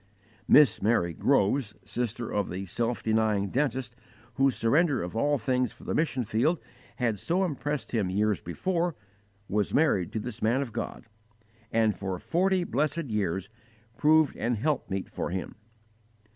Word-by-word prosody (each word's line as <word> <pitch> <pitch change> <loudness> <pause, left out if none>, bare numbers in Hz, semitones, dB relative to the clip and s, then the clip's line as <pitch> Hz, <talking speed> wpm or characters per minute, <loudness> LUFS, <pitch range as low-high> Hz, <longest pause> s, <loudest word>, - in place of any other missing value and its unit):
Miss 145 -8 +6
Mary 95 -5 +2
Groves, 105 - +1
sister 120 +1 -3
of 105 -2 0
the 95 +2 -4
self 115 +6 -2
denying 110 -3 +1
dentist 130 -3 -1 0.4
whose 135 0 +2
surrender 140 - +2
of 90 +4 -6
all 145 +5 +2
things 125 +1 0
for - - -17
the - - -3
mission 150 -5 0
field 120 +11 +1 0.4
had 115 -5 -1
so 180 - 0
impressed 145 -2 -3
him 110 -6 0
years 105 +1 +1
before, 170 - -1 0.5
was 105 0 0
married 140 - +2
to 110 - -1
this 120 +1 -7
man 120 +5 +2
of 120 -5 -9
God, 115 - -5 0.7
and 110 -2 +2
for 95 -2 -3
forty 185 - +1
blessed 150 -1 -1
years 95 -3 -1 0.5
proved 155 +3 +4
an 120 +2 0
help 145 +6 -1
meet 95 0 -3
for - - -4
him. 95 +1 -4
120 Hz, 155 wpm, -28 LUFS, 105-145 Hz, 0.7 s, Miss